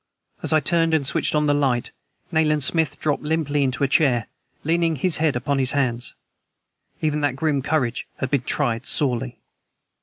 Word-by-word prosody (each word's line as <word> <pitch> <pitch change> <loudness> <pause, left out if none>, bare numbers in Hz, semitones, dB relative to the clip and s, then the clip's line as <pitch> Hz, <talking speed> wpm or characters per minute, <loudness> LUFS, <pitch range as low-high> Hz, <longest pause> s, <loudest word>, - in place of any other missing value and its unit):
As - - +1
I 155 - +5
turned 165 +2 +2
and 145 -3 0
switched 140 - +1
on 150 0 +2
the 145 - +3
light 135 -4 0 0.4
Nayland 155 -2 +2
Smith 155 0 +1
dropped 150 -2 0
limply 150 -2 0
into 135 +1 0
a - - +4
chair, 130 -5 +2 0.4
leaning 165 +1 +1
his 155 +3 0
head 155 -3 +1
upon 140 +3 -1
his 130 -2 +3
hands. 125 -4 -1 0.9
Even 150 -1 0
that 145 -3 0
grim 145 -1 0
courage 130 -4 -1
had 130 - -3
been 140 -3 +2
tried 125 -2 0
sorely. 125 -3 -1
145 Hz, 175 wpm, -22 LUFS, 130-155 Hz, 0.9 s, I